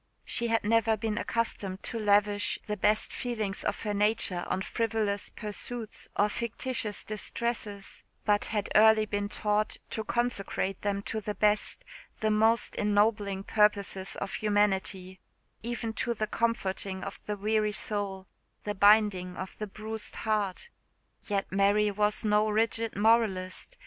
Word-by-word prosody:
She 235 - 0
had 225 0 +1
never 225 +1 +3
been 215 +1 -2
accustomed 200 -4 -2
to 230 - -4
lavish 205 -1 +3
the 210 - -2
best 210 +1 +2
feelings 220 -6 -2
of - - -2
her 210 -2 -1
nature 205 -3 +1
on 190 - -1
frivolous 220 -2 -1
pursuits 220 +1 -6
or 205 - +4
fictitious 235 0 -3
distresses, 215 -1 -3 0.2
but 205 -1 +3
had 210 -3 -2
early 220 0 +6
been 205 -1 -2
taught 210 0 0
to 220 - -2
consecrate 205 -5 -1
them 200 -1 -1
to 220 0 -3
the 210 0 -4
best, 210 0 +1 0.3
the 215 -1 +1
most 220 +2 +3
ennobling 205 -1 +1
purposes 200 -3 +2
of 195 - -4
humanity 195 -3 0 0.4
even 230 -1 -3
to 235 +2 -1
the 215 - -1
comforting 195 -4 -1
of - - -6
the 210 0 -2
weary 215 +1 +1
soul, 200 -2 -3 0.4
the 205 - -2
binding 200 -3 +4
of 190 - -6
the 215 - -3
bruised 215 +2 -7
heart. 210 - -1 0.6
Yet 200 -2 -1
Mary 200 +2 +3
was 210 +1 +1
no 210 0 +3
rigid 225 +1 0
moralist. 210 - +1
210 Hz, 140 wpm, -29 LUFS, 200-220 Hz, 0.6 s, early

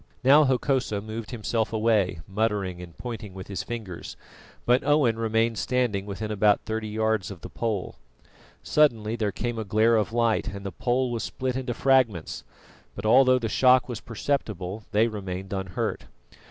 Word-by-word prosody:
Now 145 +4 +7
Hokosa 130 -4 +1
moved 110 +1 -6
himself 115 -1 -1
away, 105 -6 +1
muttering 100 -3 -1
and 85 -2 -11
pointing 110 -5 -7
with 95 +1 -9
his 95 -3 -3
fingers, 105 -4 -7 0.5
but 125 +1 +3
Owen 140 -6 +3
remained 115 -1 +1
standing 105 -2 0
within 105 +2 -4
about 105 0 +3
thirty 110 0 -4
yards 110 -2 0
of 95 -5 -9
the - - -9
pole. 110 -5 -3 0.7
Suddenly 115 -8 +2
there 110 -3 -1
came 120 +1 -3
a - - -2
glare 110 +3 +3
of 110 +1 0
light, 115 -1 +1
and 100 0 -6
the 100 - -3
pole 125 +3 0
was 115 -2 -2
split 130 -1 -3
into 125 -2 -3
fragments; 130 -11 +1 0.5
but 100 - -6
although 130 +3 +6
the 115 -2 -2
shock 125 +2 +4
was 120 -3 -5
perceptible, 110 -5 -3
they 110 +1 +3
remained 95 -3 -5
unhurt. 95 -2 -3
110 Hz, 165 wpm, -26 LUFS, 100-120 Hz, 0.7 s, Now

